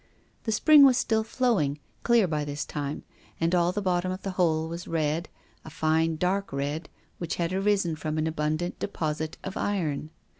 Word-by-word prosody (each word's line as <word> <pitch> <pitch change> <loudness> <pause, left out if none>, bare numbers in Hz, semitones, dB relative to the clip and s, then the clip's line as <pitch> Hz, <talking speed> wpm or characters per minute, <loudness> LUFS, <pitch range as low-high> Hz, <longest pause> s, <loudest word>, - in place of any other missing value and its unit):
The 225 - 0
spring 295 +6 +7
was 260 -3 +6
still 220 -3 +1
flowing, 220 - +1 0.2
clear 235 -5 +4
by 150 -2 -1
this 145 0 -4
time, 145 -1 -4 0.4
and 165 +1 +1
all 175 0 +3
the 205 +2 -3
bottom 185 -1 +1
of 185 - -6
the 195 - -2
hole 160 -3 +1
was 170 +1 -6
red, 160 +1 -1 0.3
a - - -9
fine, 160 +1 +1
dark 185 +4 -1
red, 145 +4 -3 0.3
which 170 -2 -3
had 170 +1 -1
arisen 195 -3 +1
from 155 0 -3
an 155 - +1
abundant 155 +2 -2
deposit 155 -4 -3
of 190 - -5
iron. 155 -7 -1
170 Hz, 180 wpm, -27 LUFS, 155-195 Hz, 0.4 s, spring